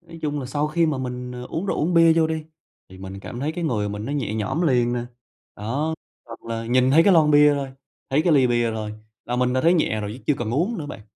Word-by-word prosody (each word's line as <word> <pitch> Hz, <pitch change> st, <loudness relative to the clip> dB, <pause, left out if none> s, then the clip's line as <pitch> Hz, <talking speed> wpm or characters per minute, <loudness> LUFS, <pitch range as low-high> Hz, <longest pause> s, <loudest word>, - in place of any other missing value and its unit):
nói 170 Hz, -1 st, -13 dB
chung 150 Hz, -1 st, -2 dB
là 130 Hz, -, -5 dB
sau 145 Hz, +3 st, -1 dB
khi 165 Hz, +2 st, +2 dB
mà 150 Hz, -4 st, -1 dB
mình, 125 Hz, -1 st, -5 dB
ờ, 125 Hz, 0 st, -7 dB
uống 170 Hz, +5 st, -3 dB
rượu, -, -, -1 dB
uống 175 Hz, +4 st, 0 dB
bia 165 Hz, -1 st, +6 dB
vô 160 Hz, -1 st, +3 dB
đi, 160 Hz, -1 st, -3 dB, 0.4 s
thì 95 Hz, -, -14 dB
mình 95 Hz, +1 st, -8 dB
cảm 120 Hz, +4 st, -7 dB
thấy 150 Hz, +3 st, -1 dB
cái 170 Hz, +1 st, -4 dB
người 105 Hz, -9 st, -1 dB
mình 105 Hz, +1 st, -5 dB
nó 140 Hz, -, -4 dB
nhẹ 120 Hz, -7 st, -2 dB
nhõm 110 Hz, +11 st, -1 dB
liền 125 Hz, -6 st, +2 dB
nè, 120 Hz, -, -1 dB, 0.6 s
đó. 140 Hz, +10 st, -2 dB, 0.3 s
Hoặc 115 Hz, -1 st, -11 dB
là 115 Hz, 0 st, -4 dB
nhìn 125 Hz, +2 st, +3 dB
thấy 160 Hz, +4 st, +6 dB
cái 195 Hz, +2 st, +5 dB
lon 155 Hz, -3 st, +5 dB
bia 145 Hz, 0 st, +6 dB
thôi, 140 Hz, -2 st, -4 dB, 0.4 s
thấy 140 Hz, +3 st, +2 dB
cái 170 Hz, -, +3 dB
ly 135 Hz, -4 st, +5 dB
bia 120 Hz, -1 st, +1 dB
thôi, 110 Hz, -1 st, -4 dB, 0.3 s
là 125 Hz, -, -3 dB
mình 125 Hz, 0 st, +1 dB
đã 130 Hz, -, +1 dB
thấy 170 Hz, +5 st, +4 dB
nhẹ 110 Hz, -10 st, +1 dB
rồi, 105 Hz, -1 st, -4 dB
chứ 130 Hz, -, -15 dB
chưa 150 Hz, -, +3 dB
cần 115 Hz, -2 st, -3 dB
uống 175 Hz, -, 0 dB
nữa 150 Hz, -, -5 dB
bạn. 145 Hz, -, -8 dB
135 Hz, 280 wpm, -23 LUFS, 120-160 Hz, 0.6 s, bia